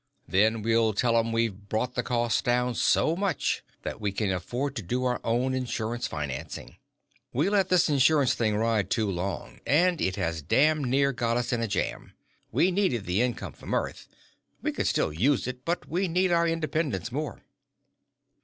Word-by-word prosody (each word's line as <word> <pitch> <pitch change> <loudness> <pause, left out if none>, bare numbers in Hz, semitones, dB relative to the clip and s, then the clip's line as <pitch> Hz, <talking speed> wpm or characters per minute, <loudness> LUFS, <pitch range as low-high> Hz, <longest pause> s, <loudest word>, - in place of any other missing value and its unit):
Then 110 +3 +2
we'll 115 -1 +3
tell 115 +3 +2
'em 115 0 +2
we've 110 -3 -1
brought 120 +3 -1
the 125 - 0
cost 120 -2 0
down 125 0 +1
so 155 +7 +2
much 190 -4 0 0.2
that - - -5
we 105 -1 0
can 100 0 -1
afford 120 +10 -3
to - - -2
do 125 +7 -2
our 125 -1 0
own 125 +3 +1
insurance 120 -2 -2
financing. 75 -4 -6 0.6
"We 155 +10 +1
let 195 -2 +2
this 180 -2 +4
insurance 145 -1 +4
thing 110 -3 0
ride 110 -2 +1
too 110 -3 0
long, 95 +1 -4
and 175 +3 +3
it 95 - 0
has 85 -4 -2
damn 150 - +3
near 135 +2 +2
got 120 -1 0
us 120 0 -1
in 120 - 0
a 115 - 0
jam. 100 - -3 0.4
We 185 - +3
needed 175 - 0
the 90 +5 +1
income 125 -1 -2
from - - -4
Earth. - - -3 0.6
We - - 0
still - - +1
could 80 - -10
use 135 +4 +2
it, 125 0 -6
but 170 +1 -2
we 185 +3 0
need 180 +2 +1
our 170 0 +3
independence 155 - -1
more." 145 -2 -4
120 Hz, 180 wpm, -27 LUFS, 110-145 Hz, 0.6 s, this